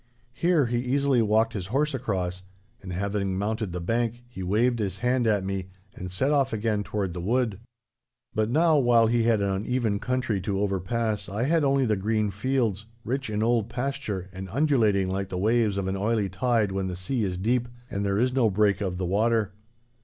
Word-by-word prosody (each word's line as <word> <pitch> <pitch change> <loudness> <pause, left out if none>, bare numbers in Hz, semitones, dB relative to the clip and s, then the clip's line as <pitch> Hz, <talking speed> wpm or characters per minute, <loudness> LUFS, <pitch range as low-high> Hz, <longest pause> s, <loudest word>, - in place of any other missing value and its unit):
Here 170 -1 +2
he 120 0 0
easily 130 0 +2
walked 110 +1 +2
his 95 -4 -4
horse 145 +7 0
across, 90 -7 -2 0.4
and, 95 - -8
having 100 +1 -1
mounted 110 0 -2
the 90 - -4
bank, 115 +6 -1
he 120 -6 -9
waved 115 +6 +1
his 100 -3 -2
hand 125 +2 +1
at 105 -3 +2
me 95 -1 -3 0.3
and 90 - -7
set 130 +11 0
off 140 -3 +2
again 110 -1 0
toward 100 -4 -3
the 90 - -5
wood. 110 0 0 0.7
But 110 0 0
now 155 +3 +4
while 120 -3 +5
he 115 +1 +2
had 110 -3 +3
an 100 - 0
uneven 105 +2 0
country 125 -5 -1
to 100 +1 -2
overpass 105 +2 -1
I 105 +4 -2
had 160 +3 +2
only 135 -1 +3
the 110 -3 +1
green 105 +1 0
fields, 110 -1 -1 0.2
rich 130 0 -2
in 105 0 -1
old 115 -1 +1
pasture 125 -8 -3
and 95 0 -7
undulating 110 -8 +2
like 95 +1 -2
the 90 - -4
waves 110 +1 +2
of 95 -1 -1
an 95 - -1
oily 105 0 0
tide 110 +1 +1
when 95 0 -2
the 90 - -4
sea 110 +7 -1
is 90 -3 -2
deep, 120 +5 0 0.2
and 100 -3 -3
there 100 0 0
is 125 +3 +2
no 125 -4 +3
break 105 +1 +2
of 95 -3 -2
the 95 - -2
water. 105 +2 +1
110 Hz, 200 wpm, -26 LUFS, 95-120 Hz, 0.7 s, while